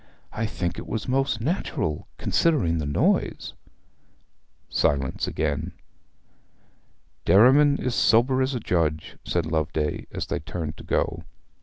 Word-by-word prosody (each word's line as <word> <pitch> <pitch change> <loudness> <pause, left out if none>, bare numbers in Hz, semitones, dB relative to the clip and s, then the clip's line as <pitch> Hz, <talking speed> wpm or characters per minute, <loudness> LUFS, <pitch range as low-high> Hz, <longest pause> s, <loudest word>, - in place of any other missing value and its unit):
'I 110 0 -1
think 85 -4 -3
it - - -9
was 110 -2 -3
most 130 -3 0
natural, 115 - -2
considering 115 - +1
the 75 - -3
noise.' 70 - 0 1.1
Silence 70 -2 0
again. 75 -3 -2 1.5
'Derriman 140 +7 +6
is 125 - -2
sober 115 +6 +3
as 130 +1 0
a - - -1
judge,' 80 -7 -1
said 85 -2 -1
Loveday, 80 -1 -2
as - - -4
they - - -3
turned 80 -1 -5
to - - -10
go. - - -1
95 Hz, 125 wpm, -25 LUFS, 80-130 Hz, 1.5 s, Derriman